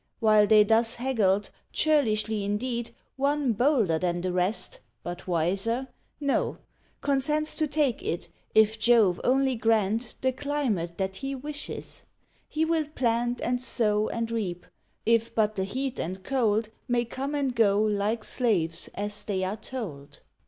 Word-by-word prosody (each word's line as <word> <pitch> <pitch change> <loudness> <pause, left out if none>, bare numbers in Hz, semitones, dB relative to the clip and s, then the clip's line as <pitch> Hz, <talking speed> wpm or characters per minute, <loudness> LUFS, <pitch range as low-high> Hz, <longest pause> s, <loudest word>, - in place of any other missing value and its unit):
While 215 -2 +5
they 215 -1 +7
thus 225 +2 +2
haggled, 210 -6 +1 0.2
churlishly 220 -9 +2
indeed, 235 +4 -2 0.3
One 280 -2 +1
bolder 225 - +2
than 175 0 -1
the 180 0 -2
rest 195 - +1 0.2
but 175 +2 -7
wiser? 195 +9 0 0.3
no 280 -2 0 0.4
Consents 300 +2 +1
to 310 - +1
take 290 -4 0
it, 170 - -3 0.3
if 220 0 +4
Jove 220 -6 +4
only 265 +1 +3
grant 225 0 +1
The 260 - +2
climate 255 - -2
that 190 0 -2
he 275 +3 -4
wishes; 290 +2 -6 0.4
he 315 +1 0
will 320 -2 0
plant, 240 -4 0
And 245 0 0
sow, 215 -4 +1
and 230 0 -3
reap, 190 -6 -3 0.4
if 230 0 +2
but 215 -1 +2
the 190 -2 -2
heat 260 +5 -3
and 185 +3 -4
cold 220 -3 +1 0.2
May 240 -1 +1
come 270 +5 -4
and 275 -4 -1
go, 205 -3 +4
like 215 +1 0
slaves, 175 -11 0
as 205 +1 -2
they 195 -3 -2
are 190 +3 -2
told. 190 - -8
225 Hz, 145 wpm, -27 LUFS, 200-260 Hz, 0.4 s, they